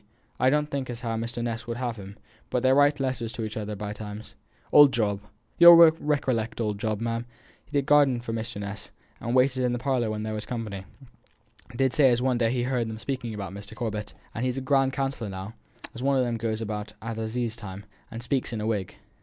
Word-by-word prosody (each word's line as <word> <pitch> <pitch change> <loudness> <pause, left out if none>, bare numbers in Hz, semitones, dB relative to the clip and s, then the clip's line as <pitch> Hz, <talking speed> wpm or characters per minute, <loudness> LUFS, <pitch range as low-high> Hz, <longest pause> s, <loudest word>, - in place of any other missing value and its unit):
I 130 - +4
don't 150 +2 +2
think 140 -3 -4
as 120 0 -5
how 115 -3 -2
Mr. 115 +1 -3
Ness 115 -1 -4
would 115 0 -3
have 120 -2 -3
him; 100 +1 -10 0.3
but 125 - -1
they 130 0 +5
write 145 +1 +4
letters 130 -4 -2
to 115 - -4
each 110 -1 -5
other 105 -1 -4
by 105 0 -5
times. 105 0 -8 0.4
Old 145 -2 +8
Job 105 -4 0 0.4
you'll 170 0 +11
recollect 145 -9 +3
old 105 -3 -1
Job, 110 -1 -1
ma'am, 115 +1 -2 0.4
he 145 - -3
that 140 - +1
gardened 140 -5 +4
for 115 - -4
Mr 115 -1 -4
Ness, 100 0 -6 0.3
and 120 +2 -2
waited 130 0 +3
in 125 -1 +1
the - - -1
parlour 125 -2 0
when 105 0 -3
there 110 0 -3
was 105 0 -4
company 105 -5 -5 0.9
did 130 +1 +2
say 145 -4 +5
as 120 -1 +2
one 125 -1 +1
day 115 -1 +2
he 125 -1 0
heerd 125 -2 0
them 110 - -5
speaking 120 -2 -4
about 100 -2 -6
Mr. 100 +2 -9
Corbet; 110 -2 -4 0.2
and 115 - -3
he's 125 0 -1
a - - -2
grand 135 0 +2
counsellor 135 -5 -2
now 95 +3 -6 0.5
one 135 +2 +2
of 130 - +2
them 120 - -1
as 115 - -4
goes 110 -1 -1
about 105 -1 -4
at 115 0 -4
assize 110 +1 -2
time, 100 -3 -8 0.2
and 115 +1 -7
speaks 125 +1 -1
in 115 - -3
a 105 - -3
wig." 105 -5 -2
115 Hz, 230 wpm, -26 LUFS, 110-130 Hz, 0.9 s, you'll